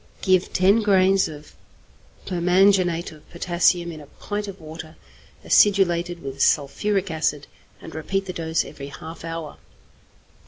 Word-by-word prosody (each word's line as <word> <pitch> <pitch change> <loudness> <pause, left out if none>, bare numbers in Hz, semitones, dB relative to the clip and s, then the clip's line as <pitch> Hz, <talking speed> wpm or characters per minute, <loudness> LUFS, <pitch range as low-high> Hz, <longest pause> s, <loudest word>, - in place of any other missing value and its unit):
Give 185 -1 +2
10 195 +4 +3
grains 195 -2 +3
of 150 -1 -11 0.7
permanganate 180 -1 +2
of 155 -1 -17
potassium 175 0 +1
in 155 -2 -9
a 145 - -14
pint 205 +7 -5
of 195 -1 -8
water 160 0 -10 0.5
acidulated 175 -4 +3
with 135 0 -6
sulphuric 185 +7 +1
acid, 150 -3 -1 0.3
and - - -11
repeat 195 +5 -2
the 185 - -5
dose 160 -1 -1
every 140 -2 -9
half 160 +4 -10
hour. 165 -2 -6
175 Hz, 130 wpm, -23 LUFS, 160-190 Hz, 0.7 s, 10